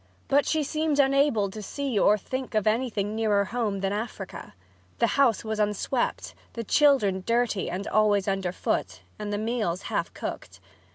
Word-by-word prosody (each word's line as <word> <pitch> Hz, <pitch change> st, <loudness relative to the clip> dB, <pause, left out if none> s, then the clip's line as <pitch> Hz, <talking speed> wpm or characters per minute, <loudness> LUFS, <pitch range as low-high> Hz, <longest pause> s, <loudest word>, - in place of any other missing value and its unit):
But 280 Hz, +1 st, +3 dB
she 315 Hz, -1 st, +1 dB
seemed 310 Hz, 0 st, -1 dB
unable 275 Hz, -7 st, +3 dB
to 215 Hz, -, -7 dB
see 265 Hz, +1 st, -2 dB
or 210 Hz, +2 st, +5 dB
think 260 Hz, +4 st, -5 dB
of 215 Hz, -, +2 dB
anything 215 Hz, -2 st, 0 dB
nearer 210 Hz, -2 st, +2 dB
home 210 Hz, -3 st, -2 dB
than 195 Hz, 0 st, 0 dB
Africa. 220 Hz, +3 st, -6 dB, 0.4 s
The -, -, +3 dB
house 260 Hz, -7 st, +3 dB
was 220 Hz, -1 st, -3 dB
unswept, 210 Hz, +4 st, -1 dB, 0.2 s
the 230 Hz, -, -4 dB
children 225 Hz, -8 st, +3 dB
dirty 235 Hz, -3 st, 0 dB
and 190 Hz, +3 st, -4 dB
always 210 Hz, -2 st, +2 dB
under 195 Hz, -2 st, 0 dB
foot, -, -, -2 dB, 0.2 s
and 210 Hz, -1 st, -4 dB
the 205 Hz, -, -1 dB
meals 215 Hz, -5 st, -1 dB
half -, -, -2 dB
cooked. -, -, -6 dB
215 Hz, 165 wpm, -26 LUFS, 205-260 Hz, 0.4 s, or